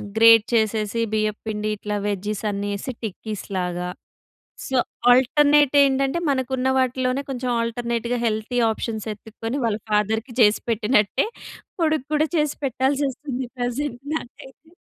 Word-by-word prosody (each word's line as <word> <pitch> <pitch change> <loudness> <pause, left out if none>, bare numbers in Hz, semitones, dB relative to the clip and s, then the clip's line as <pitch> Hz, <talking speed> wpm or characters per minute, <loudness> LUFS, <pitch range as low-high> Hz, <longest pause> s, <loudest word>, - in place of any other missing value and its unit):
Great 225 -1 +7
చేసేసి 220 0 +1
బియ్యం 215 -1 0
పిండి 215 -1 -2
ఇట్లా 210 0 -4
వెజీస్ 205 +1 -2
అన్నీ 205 0 -3
ఎసి, 260 - -5
టిక్కీస్‌ 215 0 -5
లాగా. 180 -1 -2 0.8
సో, 265 - -1 0.4
ఆల్టర్నేట్ 290 +3 +4
ఏంటంటే 275 +2 +2
మనకు 260 -2 -1
ఉన్న 260 +1 0
వాటిలోనే 255 +1 0
కొంచెం 250 -1 -2
ఆల్టర్నేట్‌గా 235 +1 -2
హెల్తీ 220 +2 -1
ఆప్షన్స్ 220 0 -4
ఎత్తుక్కొని, 225 +4 -6
వాళ్ళ 220 -2 0
ఫాదర్‌కీ 220 +3 0
చేసి 210 -1 +5
పెట్టినట్టే, 220 - +2 0.5
కొడుకు 310 -4 +1
కూడా 305 +1 +3
చేసి 300 -2 +1
పెట్టాల్సొస్తుంది 265 0 -1
ప్రెజెంట్ 245 +1 -2
నాకైతే. 320 +3 -9
235 Hz, 125 wpm, -23 LUFS, 215-265 Hz, 0.8 s, Great